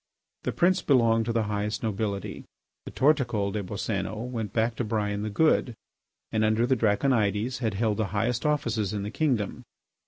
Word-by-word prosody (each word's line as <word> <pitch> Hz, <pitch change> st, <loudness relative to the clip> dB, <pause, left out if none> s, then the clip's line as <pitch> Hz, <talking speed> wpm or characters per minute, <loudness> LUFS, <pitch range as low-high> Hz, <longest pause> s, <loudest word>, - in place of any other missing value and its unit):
The -, -, -2 dB
prince 185 Hz, +1 st, +2 dB
belonged 115 Hz, -6 st, +3 dB
to 115 Hz, -, -1 dB
the 115 Hz, -1 st, +1 dB
highest 105 Hz, +1 st, -2 dB
nobility. 100 Hz, -2 st, -3 dB, 0.4 s
The -, -, -7 dB
Torticol 125 Hz, -9 st, +2 dB
des 105 Hz, -, -2 dB
Boscénos 105 Hz, +4 st, -3 dB
went 110 Hz, -5 st, -3 dB
back 115 Hz, 0 st, 0 dB
to -, -, 0 dB
Brian 105 Hz, -2 st, -1 dB
the 110 Hz, -, -2 dB
Good, 125 Hz, 0 st, +2 dB, 0.6 s
and 110 Hz, 0 st, +1 dB
under 110 Hz, +2 st, +3 dB
the 130 Hz, +1 st, +2 dB
Draconides 110 Hz, 0 st, +1 dB
had 110 Hz, -5 st, -1 dB
held 105 Hz, 0 st, 0 dB
the 110 Hz, -, +1 dB
highest 110 Hz, +5 st, -1 dB
offices 115 Hz, -9 st, 0 dB
in 100 Hz, -1 st, -2 dB
the 105 Hz, -, -4 dB
kingdom. 125 Hz, -7 st, -1 dB
110 Hz, 175 wpm, -27 LUFS, 105-120 Hz, 0.6 s, belonged